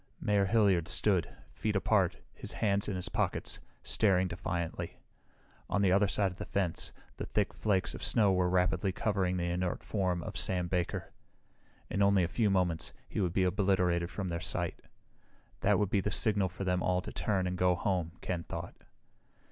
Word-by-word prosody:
Mayor 100 -1 +2
Hilliard 100 -5 +3
stood, 95 -6 +1 0.2
feet 105 -1 -2
apart, 95 -2 +2 0.2
his - - -5
hands 100 -2 +1
in 100 - -2
his 90 - -2
pockets, - - -1 0.2
staring 95 -4 +3
defiantly. 85 -2 -4 0.7
On 100 - +1
the 95 - +4
other 100 +2 +4
side 100 0 +1
of 90 - -13
the - - -4
fence, 95 -4 -1 0.3
the - - -4
thick - - 0
flakes 95 -3 0
of - - -8
snow 105 -5 +4
were 90 -1 +2
rapidly 90 0 +2
covering 95 -2 0
the 90 - -1
inert 90 0 -2
form 90 -4 -1
of - - -5
Sam 90 -2 +1
Baker. 90 -1 -2 0.8
In 100 - -1
only 100 -2 +4
a - - +1
few 105 +4 +1
moments 90 -4 0
he - - -2
would 90 -3 +1
be 95 - +2
obliterated 90 -2 +2
from 95 +2 -4
their 85 0 -2
sight. 90 -4 0 0.8
That - - +3
would 105 -2 0
be 100 - +3
the 105 - -1
signal 100 -3 +2
for 95 +3 -6
them 90 -1 +1
all 90 0 +1
to - - -7
turn 95 -4 0
and 90 0 -1
go 90 0 +3
home, 90 -3 -1
Ken 90 -2 -2
thought. - - -6
95 Hz, 185 wpm, -32 LUFS, 90-100 Hz, 0.8 s, the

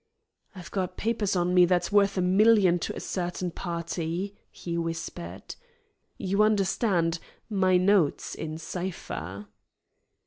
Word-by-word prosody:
"I've 185 -1 -10
got 185 -2 -2
papers 215 -3 0
on 180 0 +1
me 180 -1 +7
that's 175 +1 +1
worth 200 -1 +3
a - - +2
million 190 -1 +5
to - - -4
a - - -5
certain 180 -1 -3
party," 170 +3 -4
he 170 -1 -6
whispered. 165 +1 -5 0.6
"You 200 +1 0
understand, 195 -5 +2 0.3
my 185 -2 +3
notes 185 -4 +2
in 155 0 -5
cipher." 160 - -5
180 Hz, 125 wpm, -27 LUFS, 170-195 Hz, 0.6 s, me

